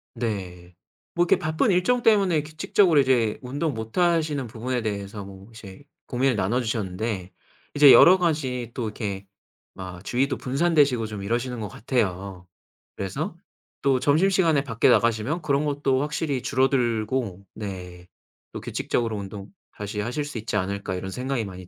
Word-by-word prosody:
네. 90 Hz, -7 st, -5 dB, 0.4 s
뭐 175 Hz, -, +3 dB
이렇게 175 Hz, -, +3 dB
바쁜 155 Hz, +6 st, +1 dB
일정 185 Hz, +8 st, +2 dB
때문에 195 Hz, -9 st, +3 dB
규칙적으로 155 Hz, +2 st, +2 dB
이제 125 Hz, -5 st, +2 dB
운동 140 Hz, +4 st, -2 dB
못 110 Hz, +6 st, -7 dB
하시는 160 Hz, -7 st, +1 dB
부분에 120 Hz, +2 st, -3 dB
대해서 100 Hz, -1 st, -4 dB
뭐 95 Hz, +2 st, -12 dB
이제 105 Hz, 0 st, -12 dB, 0.3 s
고민을 130 Hz, -1 st, +1 dB
나눠 110 Hz, +6 st, 0 dB
주셨는데, 105 Hz, -3 st, -3 dB, 0.4 s
이제 145 Hz, -1 st, +8 dB
여러가지 150 Hz, -10 st, +4 dB
또 120 Hz, -, -3 dB
이렇게 100 Hz, -3 st, -4 dB, 0.5 s
막 95 Hz, -1 st, -9 dB
주위도 130 Hz, +6 st, 0 dB
분산되시고 140 Hz, -4 st, +2 dB
좀 105 Hz, -2 st, -6 dB
이러시는 120 Hz, +3 st, -2 dB
것 105 Hz, -, -4 dB
같아요. 95 Hz, -4 st, -3 dB, 0.5 s
그래서 95 Hz, -2 st, -4 dB, 0.5 s
또 135 Hz, -2 st, +2 dB
점심시간에 160 Hz, +1 st, +3 dB
밖에 115 Hz, -4 st, +2 dB
나가시면 115 Hz, +8 st, +2 dB
그런 145 Hz, -2 st, +1 dB
것도 140 Hz, -2 st, 0 dB
확실히 150 Hz, -2 st, -2 dB
줄어들고 120 Hz, -6 st, 0 dB
네 90 Hz, -4 st, -7 dB, 0.4 s
또 -, -, -7 dB
규칙적으로 115 Hz, -2 st, -2 dB
운동 100 Hz, -, -8 dB, 0.2 s
다시 105 Hz, 0 st, -5 dB
하실 120 Hz, +7 st, -2 dB
수 145 Hz, -5 st, -5 dB
있지 110 Hz, 0 st, -4 dB
않을까 100 Hz, -1 st, -2 dB
이런 95 Hz, +1 st, -5 dB
생각이 125 Hz, 0 st, -2 dB
많이 95 Hz, -2 st, -9 dB
120 Hz, 340 characters per minute, -24 LUFS, 100-145 Hz, 0.5 s, 이제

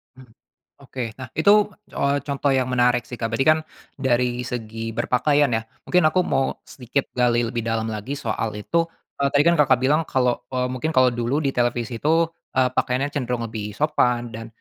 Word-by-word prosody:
Mmm, 130 Hz, -3 st, -16 dB, 0.5 s
oke. 130 Hz, -2 st, -6 dB, 0.2 s
Nah 130 Hz, -, -6 dB
itu, 160 Hz, +6 st, +5 dB, 0.5 s
oh, 140 Hz, 0 st, +2 dB
contoh 140 Hz, 0 st, 0 dB
yang 130 Hz, -1 st, +1 dB
menarik 125 Hz, -1 st, +3 dB
sih 125 Hz, -, -7 dB
Kak, 115 Hz, -, 0 dB
berarti 135 Hz, +4 st, +1 dB
kan 155 Hz, 0 st, +6 dB, 0.4 s
dari 125 Hz, -2 st, 0 dB
segi 115 Hz, -1 st, -5 dB
berpakaian 145 Hz, +4 st, +2 dB
ya 110 Hz, -1 st, 0 dB, 0.2 s
mungkin 180 Hz, -1 st, +3 dB
aku 185 Hz, -, +2 dB
mau 135 Hz, -5 st, 0 dB
sedikit 130 Hz, +2 st, -3 dB
gali 120 Hz, -1 st, +2 dB
lebih 115 Hz, -1 st, -3 dB
dalam 115 Hz, 0 st, -1 dB
lagi 110 Hz, +5 st, -5 dB
soal 110 Hz, -4 st, -3 dB
itu, 165 Hz, +11 st, 0 dB, 0.3 s
eee, 140 Hz, 0 st, +2 dB
tadi 145 Hz, 0 st, +5 dB
kan 170 Hz, +1 st, +4 dB
Kakak 130 Hz, -4 st, +4 dB
bilang 150 Hz, +4 st, +3 dB
kalau, 125 Hz, -2 st, +1 dB
eee, 125 Hz, 0 st, 0 dB
mungkin 130 Hz, +5 st, -2 dB
kalau 130 Hz, -1 st, +6 dB
dulu 120 Hz, +5 st, -1 dB
di 135 Hz, -, +1 dB
televisi 120 Hz, -1 st, -1 dB
itu, 165 Hz, +2 st, +2 dB, 0.3 s
eee, 130 Hz, -1 st, +3 dB
pakaiannya 130 Hz, +3 st, 0 dB
cenderung 125 Hz, -4 st, -2 dB
lebih 105 Hz, -2 st, -6 dB
sopan 125 Hz, -5 st, +1 dB
dan 115 Hz, 0 st, -7 dB
125 Hz, 185 wpm, -23 LUFS, 120-140 Hz, 0.5 s, kan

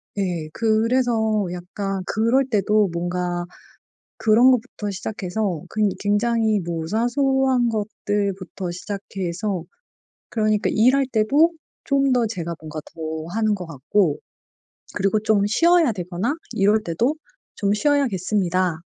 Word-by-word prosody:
네. 175 Hz, -6 st, -2 dB
그래서 225 Hz, -1 st, +1 dB
약간 195 Hz, +2 st, -4 dB
그럴 235 Hz, +5 st, +2 dB
때도 210 Hz, -2 st, +2 dB
뭔가 175 Hz, 0 st, -2 dB, 0.7 s
그런 230 Hz, +4 st, +5 dB
것부터 225 Hz, -4 st, -1 dB
시작해서 190 Hz, -2 st, -3 dB
근 215 Hz, -1 st, +1 dB
굉장히 220 Hz, +1 st, +1 dB
뭐 165 Hz, -2 st, -4 dB
사소한 260 Hz, +3 st, +2 dB
것들부터 200 Hz, -4 st, -3 dB
시작해서 195 Hz, -1 st, -4 dB, 0.7 s
그러니까 215 Hz, -2 st, +1 dB
일할 255 Hz, +5 st, +4 dB
때도 280 Hz, +10 st, +3 dB, 0.3 s
좀 275 Hz, -1 st, +2 dB
더 245 Hz, -2 st, +2 dB
제가 170 Hz, -6 st, -4 dB
뭔가 155 Hz, 0 st, -7 dB
더 160 Hz, -1 st, -5 dB
하는 215 Hz, -1 st, +1 dB
거 180 Hz, -3 st, -7 dB
같고 160 Hz, +2 st, 0 dB, 0.8 s
그리고 195 Hz, +2 st, +1 dB
좀 210 Hz, -2 st, +2 dB
쉬어야 335 Hz, +5 st, +4 dB
되거나 185 Hz, -, -2 dB, 0.2 s
이럴 205 Hz, +2 st, +3 dB
때도 220 Hz, -, 0 dB, 0.4 s
"좀 200 Hz, -1 st, +1 dB
쉬어야겠습니다." 190 Hz, -, +1 dB
210 Hz, 250 characters per minute, -22 LUFS, 180-230 Hz, 0.8 s, 그런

